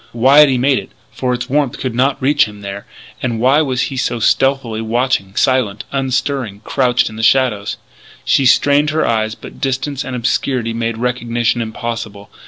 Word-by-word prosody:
Why 130 +5 +5
had 150 -1 +7
he 130 - +1
made 135 +2 +2
it - - -10
then - - -31 0.2
for 130 -1 -2
its 125 - -2
warmth 140 -1 0
could 130 -3 -3
not 135 +3 +1
reach 135 -5 +3
him 105 -1 -11
there. 100 0 -7 0.3
And 120 -3 -2
why 135 +6 +4
was 130 -4 -1
he - - -6
so 120 -2 -1
stealthily 130 -1 +1
watching 115 -3 -1
silent, 125 -6 +1
unstirring, 130 -5 -2
crouched 125 -2 +1
in 110 - -8
the - - -4
shadows? 115 -4 +2 0.5
She 135 - +3
strained 145 +3 +3
her 155 +1 0
eyes; 110 -1 0
but - - -12
distance 135 +2 -2
and 130 -3 -5
obscurity 120 0 -1
made 115 0 -2
recognition 120 0 -1
impossible. 110 -2 -6
125 Hz, 185 wpm, -16 LUFS, 115-135 Hz, 0.5 s, had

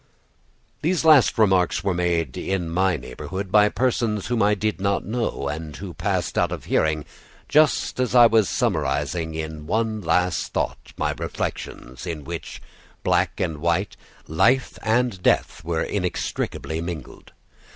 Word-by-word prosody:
These 170 +1 0
last 155 -5 +6
remarks 95 -5 +3
were 100 -2 +1
made 85 -6 0
in 90 -4 -2
my 95 +1 +2
neighborhood 95 +9 -6
by 105 0 +6
persons 115 -5 0
whom 120 -1 0
I 105 +1 +4
did 105 0 -2
not 100 0 0
know, 115 +2 -2
and 75 -1 -5
who - - -7
passed - - -1
out - - +1
of - - -5
hearing 80 -1 +1 0.4
just 150 -3 +3
as 125 -1 0
I 120 -1 +9
was 115 -3 +4
summarizing 75 +5 -1
in 80 -1 -5
one 110 +1 0
last 90 0 0
thought - - -3
my - - 0
reflections, 65 +7 -5
in 80 -4 -4
which 85 +3 -7 0.4
black - - +1
and 80 -5 -2
white, 85 +5 0 0.3
life 115 - +2
and 115 -3 +1
death, 85 - +1
were 80 0 -1
inextricably 90 -4 -3
mingled. 85 -5 -7
90 Hz, 145 wpm, -23 LUFS, 80-110 Hz, 0.4 s, I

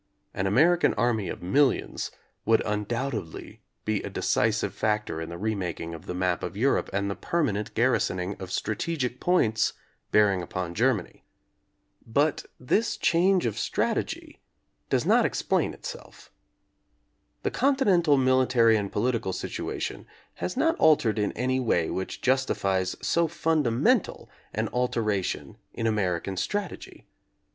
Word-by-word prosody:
An 95 - -1
American 165 - +4
army 115 -5 0
of - - -6
millions 135 +9 +1 0.3
would 115 0 +3
undoubtedly 110 -1 -3 0.2
be 110 -2 0
a - - -5
decisive 110 0 0
factor 105 -6 -1
in 80 - -5
the 85 - -6
remaking 90 -5 -3
of 80 - -10
the 90 - -4
map 90 -1 0
of 90 +3 -5
Europe 135 +5 +1
and 100 +1 -1
the 100 - -1
permanent 105 - -2
gar 120 +3 +3
risoning 95 -4 -1
of 95 -1 -6
strategic 125 - -2
points 115 -12 +2 0.4
bearing 100 -3 +4
upon 90 -1 -4
Ger 125 +7 +3
many. 90 - -9 0.8
But 145 +6 0
this 205 - 0
change 180 +2 +3
of - - -2
strategy - - -2 0.5
does - - +1
not - - +5
ex - - -1
plain - - +1
itself. - - -10 1.1
The - - 0
continental 195 - +3
military 130 -3 +4
and 100 -2 -3
polit 125 +5 +1
ical 95 -3 -3
situation - - -4 0.3
has 180 - -3
not 325 +4 +3
altered 125 -9 +4
in 105 - 0
any 130 +2 0
way 90 -10 +1
which 95 - -4
jus 130 +1 +3
tifies 95 -5 -1
so 170 0 +2
fundamental 160 - +1 0.2
an - - -1
alteration 110 -6 -1 0.2
in 115 - -3
American 95 -4 -1
strategy. 205 - -4
110 Hz, 140 wpm, -27 LUFS, 100-140 Hz, 1.1 s, not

